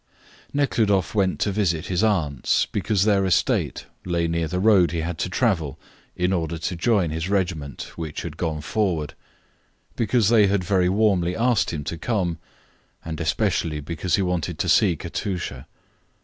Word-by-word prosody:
Nekhludoff 110 -10 +1
went 95 -3 +1
to 105 - +1
visit 90 -5 0
his 90 +2 0
aunts 80 - +1
because 100 -1 0
their 100 -2 +3
estate 90 -3 +1 0.2
lay 85 -2 0
near 85 0 -1
the 90 +4 -2
road 95 -4 +5
he 85 -1 -2
had 85 0 -4
to 95 - -1
travel 85 - 0 0.4
in 90 +1 +1
order 85 -2 -1
to 85 +3 -3
join 90 -2 +1
his 80 +3 -3
regiment, 85 -8 -2
which 80 -3 -5
had 80 -3 -6
gone 80 -2 -2
forward, 85 -4 -1 0.8
because 115 -2 +2
they 110 -3 +5
had 95 -1 +1
very 90 0 +2
warmly 95 -3 +2
asked 120 -1 +2
him 75 -4 -4
to 85 +3 -5
come, 90 -6 -1 0.7
and 80 -1 -5
especially 75 -2 0
because 85 +4 -1
he 100 - +1
wanted 90 -2 -2
to 90 - -1
see 90 +2 +4
Katusha. 80 -6 -5
90 Hz, 165 wpm, -23 LUFS, 80-100 Hz, 0.8 s, road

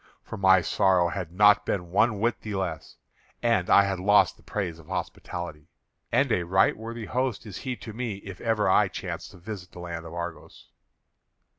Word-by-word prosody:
For - - -7
my 95 -2 +5
sorrow 90 +1 +3
had 90 -1 -5
not 105 +1 +5
been 90 -3 -3
one 105 +2 +3
whit 115 +2 0
the 105 -2 -5
less, 90 -5 -4 0.5
and 115 -7 +2
I 100 - +7
had 95 -2 -2
lost 105 +2 +4
the - - -23
praise 90 -6 -4
of 80 - -16
hospitality. 85 -4 -5 0.4
And - - +2
a - - +2
right 95 +3 +3
worthy 115 +1 -7
host 125 -3 -2
is 100 -3 -7
he 130 -2 -3
to 110 -2 -9
me 115 -2 -3
if 95 -2 -9
ever 110 -3 +1
I 95 - +5
chance - - -6
to - - -14
visit 90 -1 -8
the - - -10
land 85 -1 -6
of 80 - -9
Argos." 85 -1 -7
95 Hz, 190 wpm, -27 LUFS, 85-105 Hz, 0.5 s, I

